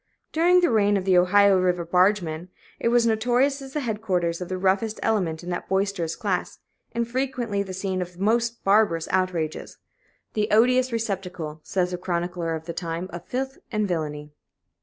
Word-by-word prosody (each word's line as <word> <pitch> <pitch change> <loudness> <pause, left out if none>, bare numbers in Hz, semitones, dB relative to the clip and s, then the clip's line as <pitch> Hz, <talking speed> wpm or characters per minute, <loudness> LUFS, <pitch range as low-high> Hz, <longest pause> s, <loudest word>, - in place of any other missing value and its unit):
During 355 +3 +4
the 345 - +3
reign 205 -2 +3
of 190 - -3
the 190 -1 +4
Ohio 195 +2 +5
River 180 -2 +1
bargemen,[A] 180 -2 +1 0.3
it - - 0
was 235 0 +4
notorious 245 +5 +2
as 270 -1 -10
the 300 - -1
headquarters 190 -8 -1
of 180 - -5
the 185 - -2
roughest 195 +4 0
elements 180 -7 0
in 180 - -5
that 175 - -4
boisterous 190 -4 0
class, 200 -6 -2 0.3
and 235 0 -1
frequently 245 -4 -1
the 195 -1 -5
scene 185 0 -2
of 180 0 -7
most 230 +3 +1
barbarous 195 -5 +3
outrages 180 -4 -1 0.6
"the 210 0 0
odious 250 +4 +4
receptacle," 185 -8 -4
says 180 +2 -1
a 180 - -3
chronicler 175 -2 -2
of 160 0 -7
the 170 - -5
time, 170 +2 -4
"of 175 +1 -7
filth 265 +1 -3
and 215 -2 0
villany." 150 -4 -3
190 Hz, 175 wpm, -25 LUFS, 175-225 Hz, 0.6 s, Ohio